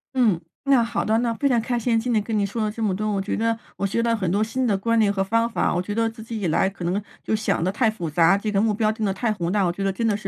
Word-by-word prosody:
嗯， 220 -10 +3 0.2
那 270 -4 +4
好 230 - -2
的， 220 +1 +2
那 235 -1 0
非 280 - +1
常 240 -4 +2
开 240 +1 -1
心 230 -1 +1
今 245 +2 -2
天 215 -2 +2
跟 220 -1 -2
你 205 - +2
说 210 +3 -2
了 215 - -1
这 225 - -7
么 200 -4 +1
多， 215 +2 -2
我 195 -1 0
觉 195 - -2
得 230 0 0 0.2
我 200 - -1
学 215 +4 0
到 230 0 +1
很 190 -6 -1
多 205 +3 +2
新 255 +4 -1
的 215 -4 +2
观 230 +4 0
念 210 -2 +3
和 195 -1 0
方 230 +4 +1
法。 235 - 0
我 175 - 0
觉 205 +3 -4
得 225 +1 +1
自 225 -1 -11
己 225 -1 -5
以 185 - 0
来 165 +4 +2
可 190 -2 -7
能 180 +4 0 0.2
就 220 - 0
想 215 -5 0
的 185 - +1
太 225 +1 +2
复 175 -7 -5
杂， 170 +4 +4
这 210 +1 -2
个 195 - +1
目 215 0 +2
标 215 0 +1
定 220 0 -3
的 195 - 0
太 220 +4 -1
宏 175 -5 -2
大， 205 0 +2
我 175 - +1
觉 195 +3 -5
得 195 - 0
真 230 +5 -2
的 205 - +1
是 210 - -7
215 Hz, 370 characters per minute, -23 LUFS, 195-230 Hz, 0.2 s, 那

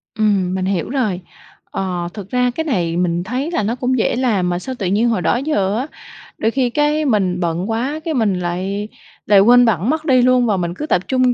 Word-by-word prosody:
Ừm, 200 -4 +1
mình 185 0 -2
hiểu 190 -3 -1
rồi. 220 -9 -1 0.5
Ờ, 180 -2 -3
thực 200 -3 -8
ra 250 +1 +1
cái 320 - -1
này 175 - -1
mình 175 -1 0
thấy 255 - -3
là 275 - 0
nó 225 +4 -1
cũng 255 +1 0
dễ 230 - +1
làm 215 -8 +1
mà 175 - -1
sao 260 +7 -6
tự 200 - -2
nhiên 215 +5 +2
hồi 220 -5 0
đó - - +2
giờ 215 -8 0
á, 260 +5 -2 0.5
đôi 225 - 0
khi 255 -1 +1
cái 295 +3 +1
mình 195 -8 +1
bận 175 +3 -2
quá 255 +7 -2
cái 325 - -1
mình 215 -8 +1
lại 190 +4 -3 0.4
lại 205 -2 +5
quên 245 +4 +6
bẵng 210 -1 +1
mất 310 +1 -1
đi 260 -5 +4
luôn 250 0 +4
và 210 -4 +1
mình 175 -1 -2
cứ 300 - -4
tập 185 - +1
trung 255 -1 +2
220 Hz, 235 wpm, -18 LUFS, 185-255 Hz, 0.5 s, quên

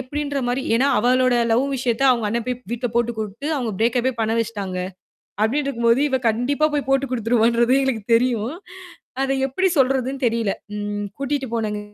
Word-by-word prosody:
எப்டீன்ற 285 +2 -3
மாரி. 250 +2 -1
ஏன்னா, 255 +4 +3
"அவளோட 255 +2 +3 0.2
லவ் 250 +4 +3
விஷயத்த 245 0 -1
அவுங்க 235 -3 +1
அண்ணன் 230 +2 -2
போய் 250 -1 -1
வீட்டுல 240 +1 -2
போட்டுக் 235 -1 0
குடுத்து, 215 +6 -5
அவுங்க 240 -4 -2
பிரேக் 235 +2 +2
அப்பே 260 +2 0
பண்ண 220 0 +1
வச்சுட்டாங்க." 205 -5 -3 0.7
அப்படீன்னு 275 +6 +1
இருக்கும்போது 235 -1 +2
இவ 265 - +1
கண்டிப்பா 270 +7 +1
போய்ப் 285 -3 -2
போட்டுக் 270 -1 +1
குடுத்துருவான்றது 235 +1 +2
எனக்குத் 230 -4 -2
தெரியும். 240 +1 +1 0.7
அத 270 0 0
எப்டி 370 +9 +1
சொல்றதுன்னு 265 +1 +1
தெரியல. 230 -4 0 0.2
ம் 205 0 -3
கூட்டிட்டு 275 0 -2
போனங்க 215 -2 -2
245 Hz, 165 wpm, -21 LUFS, 225-265 Hz, 0.7 s, ஏன்னா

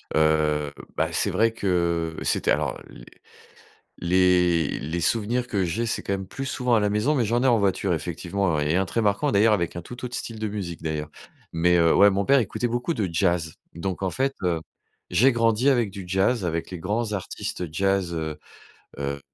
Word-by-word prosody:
Heu, 75 -1 +2 0.2
bah, - - 0
c'est - - 0
vrai 115 +1 +2
que 85 -6 0
c'était - - +1
alors, - - 0
les - - -13 1.0
les 90 -2 +2
les 80 +4 -3
souvenirs 115 +7 0
que 100 -3 0
j'ai, 110 +8 -1
c'est, 115 - -2
quand - - -2
même, 95 -1 -3
plus 135 - -5
souvent 125 -2 0
à - - +3
la 105 - +2
maison, 105 +9 +1
mais 120 - +2
j'en 120 +4 +1
ai 135 - +3
en 120 -2 +4
voiture, 95 -2 +1
effectivement, 85 +1 -1
et 75 +3 +1
1 95 - +2
très 115 - -2
marquant, 100 -1 +1
d'ailleurs, 105 +2 +5
avec 85 -4 -2
un 85 - -5
tout 125 +8 -9
autre 125 0 -5
style 115 -2 -6
de 110 - -2
musique, 100 -5 -5
d'ailleurs. 75 -1 -3 0.4
Mais 90 +1 +3
heu, 85 0 +4
ouais, 100 +1 +7
mon 100 +1 0
père 140 0 +5
écoutait 120 +2 -1
beaucoup 120 +8 -1
de 105 -8 -1
jazz. 85 -3 0 0.2
Donc, 95 +2 -4
en 95 - 0
fait, 135 +5 -1
heu, 85 -3 +1 0.5
j'ai 130 +4 +4
grandi 115 +2 +2
avec 120 -6 +3
du 95 -1 -8
jazz, 95 +4 +1
avec 85 0 -2
les 90 - -6
grands 105 +6 -2
artistes 95 -2 -4
jazz, 95 0 0
heu, 80 -2 -4 0.6
heu, 70 0 -3
95 Hz, 200 wpm, -24 LUFS, 85-115 Hz, 1.0 s, ouais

